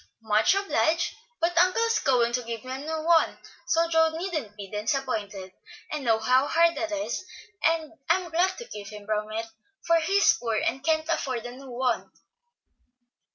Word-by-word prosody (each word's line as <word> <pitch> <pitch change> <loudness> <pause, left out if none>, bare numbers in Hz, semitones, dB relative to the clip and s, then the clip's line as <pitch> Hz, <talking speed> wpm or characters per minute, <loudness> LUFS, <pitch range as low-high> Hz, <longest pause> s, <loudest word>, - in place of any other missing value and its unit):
"Much 220 - +3
obliged, 330 -3 +1 0.3
but 340 +1 +1
uncle 370 +6 +4
is 460 0 +2
going 245 -4 +2
to 250 - +1
give 230 0 -6
me 255 - -6
a 260 - -4
new 315 +2 -4
one; 330 0 +3 0.3
so 330 +1 +3
Joe 325 -1 +4
needn't 310 - -4
be 200 -1 -7
disappointed. 210 -3 -3 0.4
I 300 - -2
know 230 -5 +2
how 255 +5 +3
hard 335 0 +4
that 330 -1 -3
is, 305 0 -3 0.4
and 325 -1 +1 0.2
am 360 -2 +1
glad 365 +3 +1
to 475 - -7
keep 205 - -8
him 210 -1 -10
from 215 0 -2
it, 225 +1 -3 0.4
for 335 0 +4
he's 390 +5 +4
poor 230 -2 -1
and 260 +4 -1
can't 315 0 +1
afford 255 -7 -2
a 245 - -5
new 265 +2 -11
one." 250 0 -1
275 Hz, 180 wpm, -26 LUFS, 230-330 Hz, 0.4 s, uncle